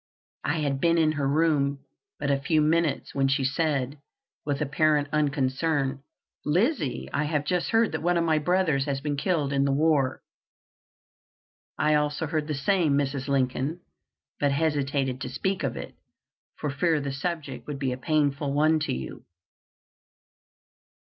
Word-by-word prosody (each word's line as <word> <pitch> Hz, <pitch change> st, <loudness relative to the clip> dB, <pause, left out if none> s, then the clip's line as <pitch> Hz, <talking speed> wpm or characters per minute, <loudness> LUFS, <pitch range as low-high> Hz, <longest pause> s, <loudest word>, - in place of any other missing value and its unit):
I 160 Hz, -, 0 dB
had 140 Hz, -2 st, -1 dB
been 170 Hz, 0 st, +3 dB
in 160 Hz, -2 st, +3 dB
her 145 Hz, -3 st, -1 dB
room 140 Hz, -2 st, +1 dB, 0.3 s
but 140 Hz, -, -1 dB
a 140 Hz, -, +2 dB
few 155 Hz, +3 st, +2 dB
minutes 155 Hz, -1 st, +1 dB
when 135 Hz, -1 st, +2 dB
she 135 Hz, 0 st, +1 dB
said, 140 Hz, -1 st, 0 dB, 0.4 s
with 145 Hz, -2 st, -2 dB
apparent 150 Hz, 0 st, +2 dB
unconcern, 140 Hz, -1 st, 0 dB, 0.4 s
"Lizzie, 180 Hz, -, 0 dB
I 150 Hz, -, +1 dB
have 150 Hz, -1 st, -1 dB
just 180 Hz, +2 st, 0 dB
heard 225 Hz, 0 st, +3 dB
that 160 Hz, -, -3 dB
one 175 Hz, +1 st, +2 dB
of 170 Hz, -, +2 dB
my 160 Hz, -2 st, +2 dB
brothers 155 Hz, -4 st, +1 dB
has 140 Hz, -2 st, -1 dB
been 145 Hz, +1 st, -2 dB
killed 145 Hz, -2 st, 0 dB
in 140 Hz, 0 st, +2 dB
the 140 Hz, -, +2 dB
war." 145 Hz, -2 st, +2 dB, 1.5 s
"I 150 Hz, -, +2 dB
also 150 Hz, +1 st, +1 dB
heard 155 Hz, -1 st, -2 dB
the 150 Hz, -, -2 dB
same, 155 Hz, +2 st, +2 dB
Mrs. 135 Hz, -1 st, -1 dB
Lincoln, 135 Hz, +4 st, 0 dB, 0.6 s
but 145 Hz, -1 st, +2 dB
hesitated 140 Hz, -3 st, 0 dB
to -, -, -3 dB
speak 190 Hz, 0 st, -2 dB
of -, -, -2 dB
it, -, -, -7 dB, 0.6 s
for 150 Hz, -, -3 dB
fear 160 Hz, +2 st, +1 dB
the 140 Hz, -1 st, -3 dB
subject 160 Hz, +2 st, -4 dB
would 145 Hz, -2 st, -4 dB
be 135 Hz, -2 st, -1 dB
a 125 Hz, -, -3 dB
painful 145 Hz, 0 st, +1 dB
one 155 Hz, +2 st, +3 dB
to 155 Hz, -, -1 dB
you." 65 Hz, +1 st, -6 dB
145 Hz, 160 wpm, -26 LUFS, 140-160 Hz, 1.5 s, been